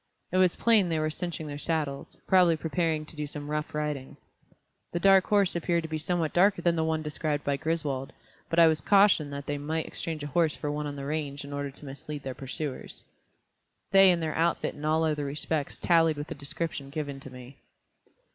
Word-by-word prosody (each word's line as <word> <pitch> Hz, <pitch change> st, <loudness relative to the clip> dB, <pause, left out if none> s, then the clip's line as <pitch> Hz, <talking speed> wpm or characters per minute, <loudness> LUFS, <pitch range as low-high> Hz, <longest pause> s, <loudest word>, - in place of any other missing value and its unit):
It 185 Hz, -, +1 dB
was 185 Hz, -2 st, +4 dB
plain 215 Hz, -6 st, +3 dB
they 165 Hz, -, 0 dB
were 155 Hz, 0 st, 0 dB
cinching 170 Hz, -1 st, -4 dB
their 145 Hz, -1 st, -6 dB
saddles, 150 Hz, -4 st, -2 dB
probably 180 Hz, -3 st, +5 dB
preparing 160 Hz, -1 st, -1 dB
to 160 Hz, -, -10 dB
do 150 Hz, -1 st, -4 dB
some 145 Hz, 0 st, -6 dB
rough 150 Hz, 0 st, -3 dB
riding. 150 Hz, -3 st, -3 dB, 0.8 s
The 175 Hz, -, 0 dB
dark 195 Hz, 0 st, +5 dB
horse 200 Hz, -4 st, +3 dB
appeared 170 Hz, 0 st, 0 dB
to 160 Hz, -, -6 dB
be 155 Hz, 0 st, -2 dB
somewhat 165 Hz, 0 st, -1 dB
darker 185 Hz, 0 st, +3 dB
than 170 Hz, -1 st, +3 dB
the 160 Hz, -, +1 dB
one 160 Hz, -1 st, -1 dB
described 150 Hz, -1 st, -2 dB
by 140 Hz, -1 st, 0 dB
Griswold, 150 Hz, -4 st, -2 dB, 0.4 s
but 165 Hz, -, -2 dB
I 170 Hz, -, +8 dB
was 160 Hz, -2 st, +3 dB
cautioned 195 Hz, -4 st, +4 dB
that 140 Hz, 0 st, -6 dB
they 145 Hz, 0 st, -3 dB
might 160 Hz, +2 st, -2 dB
exchange 160 Hz, -3 st, -5 dB
a 145 Hz, -1 st, -7 dB
horse 165 Hz, -3 st, +2 dB
for 145 Hz, -, -3 dB
one 150 Hz, 0 st, -3 dB
on 145 Hz, -, -5 dB
the 140 Hz, -1 st, -6 dB
range 145 Hz, -1 st, -3 dB
in 140 Hz, -, -8 dB
order 145 Hz, 0 st, -3 dB
to 140 Hz, +2 st, -14 dB
mislead 140 Hz, +1 st, -7 dB
their 130 Hz, -, -4 dB
pursuers. 135 Hz, +1 st, -5 dB, 0.9 s
They 195 Hz, -1 st, +8 dB
and 170 Hz, -2 st, +2 dB
their 155 Hz, -, -1 dB
outfit 170 Hz, +1 st, 0 dB
in 145 Hz, -, -11 dB
all 160 Hz, +1 st, +2 dB
other 150 Hz, -2 st, 0 dB
respects 145 Hz, +1 st, -2 dB
tallied 165 Hz, -3 st, +3 dB
with 145 Hz, +2 st, -5 dB
the -, -, -3 dB
description 140 Hz, 0 st, -5 dB
given 145 Hz, -1 st, -4 dB
to 135 Hz, -, -10 dB
me. 125 Hz, +1 st, -12 dB
155 Hz, 215 wpm, -28 LUFS, 145-170 Hz, 0.9 s, I